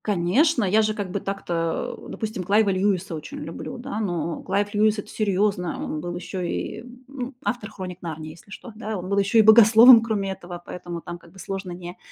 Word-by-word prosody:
Конечно, 220 - +2
я 205 +3 +3
же, 215 0 0
как 200 -4 -4
бы, 200 - -2
так-то, 170 -4 -3
допустим, 215 -4 -4
Клайва 205 +2 +3
Льюиса 190 -2 0
очень 155 -1 -7
люблю, 165 +9 -7
да. 245 -2 -5
Но 170 -6 -2
Клайв 200 +2 -1
Льюис- 215 +1 +3
это 205 - -6
серьёзно. 200 -3 -1
Он 155 - -4
был 175 +1 -5
ещё 180 +1 -5
и, 175 +5 -4 0.2
ну, 260 -1 -6
автор 210 +1 -2
"Хроник 185 -3 -8
Нарнии", 155 -2 -6
если 165 +5 -17
что, 230 +3 -10
да. 215 -1 -5
Он 185 +1 -6
был 200 0 +2
ещё 200 +3 +2
и 220 - +8
богословом, 225 +2 +9
кроме 210 -4 -2
этого, 175 -2 -8
поэтому 175 -1 -7
там, 175 +1 -8
как 170 - -18
бы, 190 - -18
сложно 190 0 -5
не 175 0 -8
195 Hz, 205 wpm, -24 LUFS, 175-215 Hz, 0.2 s, богословом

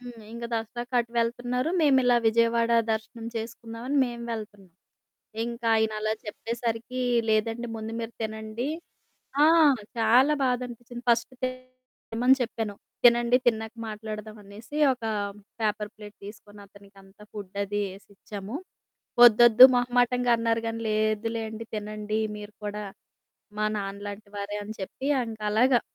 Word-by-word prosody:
హ్మ్. 245 -2 -10
ఇంగ 235 0 -6
దసరాకటు 240 +1 -2
వెళ్తన్నారు, 245 +5 0
మేమిలా 260 -5 +4
విజయవాడ 230 +1 +3 0.2
దర్శనం 225 +1 -5
చేసుకుందామని 230 +3 -5
మేము 240 -1 -6
వెళ్తున్నాం. 205 -4 -8 0.7
ఇంక 235 0 -6
ఆయనలా 215 -1 +1
చెప్పేసరికీ, 230 +3 -3 0.3
లేదండి, 225 +2 0
ముందు 220 +1 -6
మీరు 230 0 -5
తినండి. 220 +3 -4 0.8
ఆ! - - +8 0.5
చాలా 245 +6 +5
బాధనిపిచ్చింది. 245 -1 -4
ఫస్ట్ 235 +1 +2
తినమని 255 -1 -1
చెప్పాను. 225 -3 -3 0.3
తినండి, 240 +1 +6
తిన్నాక 220 -1 +1 0.2
మాట్లాడదామనేసి 215 +3 -8 0.2
ఒకా 230 -3 -5 0.5
పేపర్ 210 -1 -1
ప్లేట్ 210 -1 -12
తీసుకొనతనికంతా 200 -1 -14
ఫుడ్డది 200 0 -4
యేసిచ్చాము. 200 +2 -9 0.7
"ఒద్దొద్దు" 240 +1 +9
మొహమాటంగా 245 0 +2
అన్నారు 230 0 0
గానీ, 225 0 -3
లేదులేండి 220 +1 -1
తినండి, 210 0 -3 0.2
మీరు 210 0 -9
కూడా 210 0 -4 0.8
మా 215 - +2
నాన్నలాంటి 200 +1 -6
వారే 200 +1 -4
అని 215 +1 -7
చెప్పి 195 +7 -6 0.2
ఇంకలాగా, 220 +3 +2
225 Hz, 105 wpm, -27 LUFS, 210-240 Hz, 0.8 s, ఒద్దొద్దు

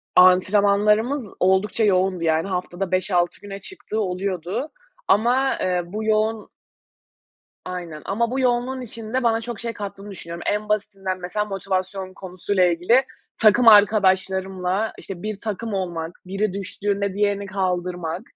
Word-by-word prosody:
Antrenmanlarımız 205 +6 +4
oldukça 190 +4 +2
yoğundu, 185 -3 +2
yani, 160 +2 +1
haftada 180 0 -3
5-6 185 -2 +1
güne 200 -1 -7
çıktığı 305 - -6
oluyordu 190 - -2 0.4
ama, 250 +5 +3
eee, 180 -1 0
bu 210 +5 -5
yoğun 215 0 +1 1.2
Aynen, 175 -4 -6
ama 230 +4 0
bu 265 - -1
yoğunluğun 255 +1 0
içinde 230 +1 -4
bana 225 -1 +2
çok 235 -2 -6
şey 230 0 -4
kattığını 200 -1 -7
düşünüyorum. 170 -2 -8
En 210 +1 -1
basitinden, 195 -3 -2
mesela, 210 +4 -2
motivasyon 190 -1 -3
konusu 185 +1 -5
ile 180 -3 +4
ilgili 205 +10 +3 0.4
takım 230 +2 +5
arkadaşlarımla, 190 -1 +4
işte, 185 -2 -8
bir 215 -2 -4
takım 220 +1 -4
olmak, 170 -4 -3
biri 195 +2 -1
düştüğünde 200 0 -2
diğerini 200 0 0
kaldırmak, 180 -3 -2
195 Hz, 130 wpm, -23 LUFS, 185-215 Hz, 1.2 s, takım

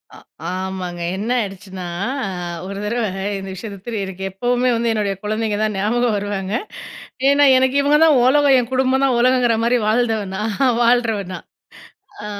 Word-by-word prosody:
அ. - - -13 0.3
ஆமாங்க, 185 -1 -5 0.2
என்ன 210 +4 -4
ஆயிடுச்சுன்னா 190 -2 -7 0.8
ஒரு 195 0 -6
தடவ 235 +3 -1 0.4
இந்த 195 0 -7
விஷயத்த 200 +1 -7
திரு 225 -4 -3
எனக்கு 190 0 -8
எப்பவுமே 245 +5 0
வந்து 230 0 0
என்னுடைய 205 -3 -1
குழந்தைங்க 215 0 -1
தான் 215 -1 -1
ஞாபகம் 225 +3 +1
வருவாங்க. 200 -1 -3 0.8
ஏன்னா, 285 +1 +5
எனக்கு 260 +1 +2
இவங்க 290 +1 +3
தான் 300 -5 +5
உலகம். 280 +1 +5
என் 245 0 -4
குடும்பம் 260 +1 +2
தான் 255 -3 +2
உலகங்குற 250 -2 +3
மாதிரி, 245 +1 +3
வாழ்ந்தவ 225 -1 +1
நான் 210 +1 -3 0.3
வாழுறவ 235 -3 +2
நான். - - -9 0.8
அ - - -5
225 Hz, 155 wpm, -19 LUFS, 200-245 Hz, 0.8 s, ஏன்னா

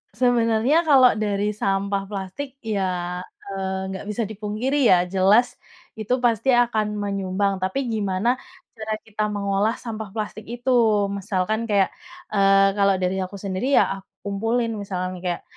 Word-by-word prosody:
Sebenarnya 245 +6 +2
kalau 265 -4 +7
dari 205 -1 0
sampah 195 -1 -1
plastik 205 +8 -6
ya, 185 -4 -2 0.2
eee, 190 -1 -4
nggak 190 - -6
bisa 210 +2 -2
dipungkiri 220 +6 -1
ya, 185 - +7 0.2
jelas 200 +6 +3 0.4
itu 220 +3 -1
pasti 235 +1 +2
akan 220 -3 +1
menyumbang, 195 -1 -1
tapi 190 +9 -1
gimana 200 0 0 0.5
cara 220 0 -3
kita 215 -1 -3
mengolah 205 +1 0
sampah 220 -3 -6
plastik 215 0 -5
itu. 240 +3 -4 0.4
Misalkan 200 +1 -1
kayak, 200 -3 +3 0.4
eee, 195 -1 +5
kalau 200 -1 +4
dari 185 +1 0
aku 185 +1 -4
sendiri 200 +7 -1
ya - - +6 0.2
aku 195 - -21 0.2
kumpulin, 225 +4 -1
misalkan 185 -2 -4
kayak 175 -1 -2
205 Hz, 140 wpm, -23 LUFS, 195-225 Hz, 0.5 s, kalau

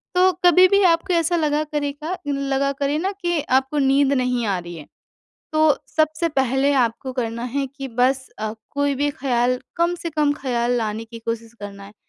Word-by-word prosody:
तो 370 +1 +5
कभी 360 +1 +7
भी 400 +2 +3
आपको 340 +2 +1
ऐसा 335 0 +2
लगा 305 -2 +1
करेगा 300 +3 -3
लगा 275 -1 0
करे 280 +1 -1
ना 375 +5 -1
कि 345 -2 0 0.2
आपको 270 +3 -2
नींद 275 0 +3
नहीं 250 -2 0
आ 195 -2 +1
रही 175 0 -9
है, 155 -3 -10 0.7
तो 310 -1 +4
सबसे 310 +2 0
पहले 270 -1 +1
आपको 255 0 0
करना 235 -2 -3
है 280 -1 +1
कि 275 +1 -8
बस 260 +2 +1
अ, 215 0 -3 0.2
कोई 285 0 0
भी 290 +2 0
ख़्याल 250 -2 0 0.2
कम 340 +1 +1
से 335 -1 -5
कम 300 -2 +1
ख़्याल 245 -4 -1
लाने 220 -1 -3
की 230 0 -10
कोशिश 230 0 -5
करना 200 -1 -8
है। 200 +1 -13
275 Hz, 190 wpm, -22 LUFS, 240-310 Hz, 0.7 s, कभी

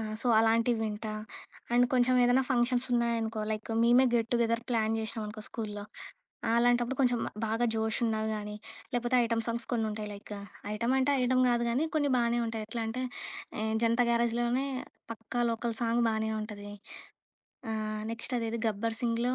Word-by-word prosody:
ఆ! - - -2 0.2
సో, - - -3
అలాంటివి 230 +1 +3
వింటా. 215 0 -4 0.6
అండ్ 245 +1 +5
కొంచెం 255 0 +4
ఏదైనా 245 +2 +4
ఫంక్షన్స్ 245 0 +2
ఉన్నాయనుకో 230 -2 0
లైక్ 215 0 -3
మేమే 240 +2 +6
గెట్ 230 -1 +2
టు 240 - +4
గెదర్ 230 0 0
ప్లాన్ 225 -3 +1
జేశామనుకో 220 -1 -4
స్కూలులో. 210 -3 -5 0.7
అలాంటప్పుడు 240 +2 +3
కొంచెం 245 -3 +3 0.3
బాగా 225 +2 +1
జోషున్నని 220 0 0
గాని 210 0 -5 0.4
లేపోతే 245 +1 +1
ఐటెమ్ 230 0 0
సాంగ్స్ 235 0 -2
కొన్ని 225 -2 +1
ఉంటాయి 210 0 -4
లైక్ 200 +1 -12 0.4
ఐటెమ్ 235 +4 0
అంటే 265 +2 +3
ఐటం 255 +1 +3
గాదు 240 -1 +2
గానీ 260 +7 +1
కొన్ని 290 -2 +2
బానే 235 0 +2
ఉంటాయి. 225 -1 -3
ఎట్లా 230 0 -2
అంటే 255 +3 -3 0.5
హ్మ్ 220 0 -1
'జనతా 235 +1 +3
గ్యారేజ్' 235 0 +2
లోనే 245 +3 +1 0.5
'పక్కా 225 +2 -3
లోకల్' 230 0 -2
సాంగ్ 235 0 +2
బానే 220 0 -1
ఉంటది. 205 -1 -7 1.0
ఆహ్, 215 0 -3
నెక్స్ట్ 230 +2 -4
అదేది 230 0 -2
'గబ్బర్ 225 +1 -1
సింగ్‌' 230 0 +1
లో 255 - +1
230 Hz, 165 wpm, -30 LUFS, 220-240 Hz, 1.0 s, మేమే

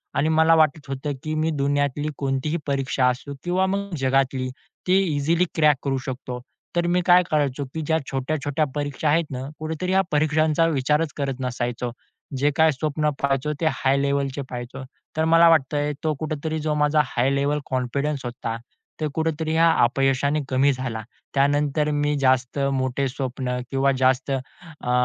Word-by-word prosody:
आणि 155 - +2
मला 160 +1 +5
वाटत 155 -2 +2
होतं, 135 +2 -3
की 155 - -3
मी 155 +1 +1
दुनियातली 145 0 0
कोणतीही 135 +3 -1
परीक्षा 135 -2 +1
असू 125 +3 -4
किंवा 180 +2 +1
मग 200 0 -2
जगातली, 130 -1 +1 0.4
ती 185 - +5 0.2
इझिली 165 +5 +2
क्रॅक 150 -3 +4
करू 135 -1 0
शकतो. 125 -1 -5 0.4
तर 175 0 +1
मी 180 +1 +2
काय 180 0 +6
करायचो, 145 -2 +1
की 160 - -3
ज्या 160 +1 +2
छोट्या-छोट्या 145 +2 -1
परीक्षा 145 +1 -1
आहेत 165 +3 +3
ना, 130 +1 -4
कुठेतरी 160 +4 -3
या 190 0 +4
परीक्षांचा 155 +1 +2
विचारच 150 +1 +1
करत 135 -2 -2
नसायचो. 120 -1 -3 0.5
जे 145 +2 +2
काय 160 0 +5
स्वप्न 150 +1 -1
पहायचो, 140 +2 0
ते - - +1
हाय 135 0 +1
लेव्हलचे 140 0 0
पहायचो. 125 +2 -6 0.3
तर 160 - +2
मला 165 +1 +6
वाटतंय, 145 -1 +2
तो 155 -1 +1
कुठेतरी 155 0 -3
जो 155 0 -1
माझा 150 0 +3
हाय 125 +1 0
लेव्हल 145 +2 +1
कॉन्फिडन्स 135 +2 -2
होता, 120 -2 -4 0.4
ते 155 - 0
कुठेतरी 160 0 -1
या 165 +1 +5
अपयशाने 135 +4 +2
कमी 135 +2 +3
झाला. 125 -3 -4 0.3
त्यानंतर 145 +1 +2
मी 145 0 +1
जास्त 130 -1 +2 0.2
मोठे 130 +1 0
स्वप्न 130 -1 -3
किंवा 135 0 +2
जास्त 130 +1 +2
अ, 135 +2 -5
145 Hz, 160 wpm, -23 LUFS, 135-155 Hz, 0.5 s, काय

